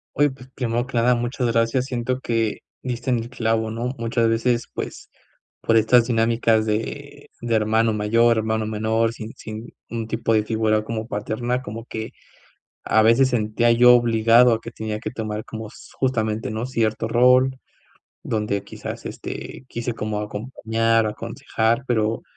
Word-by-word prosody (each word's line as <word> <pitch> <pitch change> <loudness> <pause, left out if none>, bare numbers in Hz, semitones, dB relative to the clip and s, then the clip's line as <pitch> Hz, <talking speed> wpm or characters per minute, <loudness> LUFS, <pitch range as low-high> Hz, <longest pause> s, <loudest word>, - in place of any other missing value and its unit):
Oye 145 -1 +3
pues 130 -1 -14
primero 120 0 -1
que 125 - -4
nada, 120 +2 +4
muchas 120 +1 -1
gracias, 115 +2 +1
siento 125 0 -2
que 115 -4 -1 0.2
diste 125 0 -3
en 120 - +2
el 115 +1 -6
clavo, 110 -2 0
¿no? 115 +3 -3
Muchas 115 0 +1
veces, 115 +1 +1
pues - - -6 0.5
por 115 - +2
estas 115 +2 +4
dinámicas 115 -1 +2
de 110 +1 -4
de 120 -1 0
hermano 110 +1 +2
mayor, 115 +2 +3
hermano 110 0 0
menor, 110 +1 0
sin 110 -1 -8
sin 110 +2 -8 0.2
un 115 -1 -4
tipo 115 0 -1
de 110 -1 +3
figura 110 -1 +1
como 110 0 -4
paterna, 120 +4 -2
como 115 -1 -7
que 110 -2 -6 0.7
a 110 - +4
veces 115 +4 +5
sentía 115 0 +2
yo 125 +1 +7
obligado 120 0 +5
a 110 - -4
que 115 - -8
tenía 110 -1 -5
que 105 - -4
tomar 110 -2 -4
como 110 0 -7
s 110 - -15
justamente, 110 -5 0
¿no? 110 +2 -3
Cierto 115 -3 -1
rol, 125 +2 +4 0.7
donde 105 -2 -1
quizás, - - -8
este, - - -7
quise 120 0 -4
como 105 -1 -3
acompañar 115 +1 0
o - - 0
aconsejar, 115 +1 -1
pero 110 -2 0
115 Hz, 165 wpm, -22 LUFS, 110-120 Hz, 0.7 s, yo